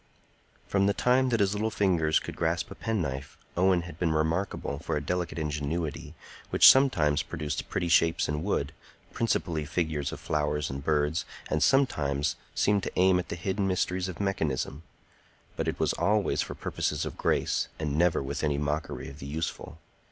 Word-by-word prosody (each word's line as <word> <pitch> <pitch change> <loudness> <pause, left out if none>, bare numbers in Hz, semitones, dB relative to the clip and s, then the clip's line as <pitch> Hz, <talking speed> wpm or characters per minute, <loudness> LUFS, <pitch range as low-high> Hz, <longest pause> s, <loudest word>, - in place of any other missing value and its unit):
From 100 0 +2
the 100 - +1
time 130 +1 +3
that 115 -3 +1
his 100 0 +2
little 105 +2 0
fingers 85 -7 +2
could - - -4
grasp 85 -3 -1
a - - -4
penknife, 75 -10 -3 0.2
Owen 90 -1 +3
had 85 -2 -10
been 85 -3 +1
remarkable 80 -2 -1
for 75 - -2
a 75 - -4
delicate 85 -1 -2
ingenuity, 75 +1 -3 0.3
which - - +7
sometimes 80 - +3
produced 75 -3 -4
pretty 85 - -1
shapes 85 0 +3
in 75 0 -2
wood, 80 -7 -1 0.4
principally 85 -8 0
figures 80 -2 -2
of - - -7
flowers 75 -1 -1
and 70 +1 -6
birds, 75 +2 +1 0.3
and - - +1
sometimes 75 - +2 0.2
seemed 105 -1 +2
to - - -4
aim 95 0 +5
at 90 - -5
the - - -3
hidden 95 +3 -1
mysteries 90 0 0
of 90 - -7
mechanism. 80 -7 -1 0.7
But - - -2
it - - -2
was - - +2
always 105 0 +1
for - - -5
purposes - - -2
of - - -5
grace, - - 0
and 75 -2 -2
never 85 -2 +2
with 65 - -4
any 75 -2 +1
mockery 75 +1 -3
of 70 +2 -10
the 70 - -7
useful. 80 +1 -4
80 Hz, 175 wpm, -28 LUFS, 75-95 Hz, 0.7 s, which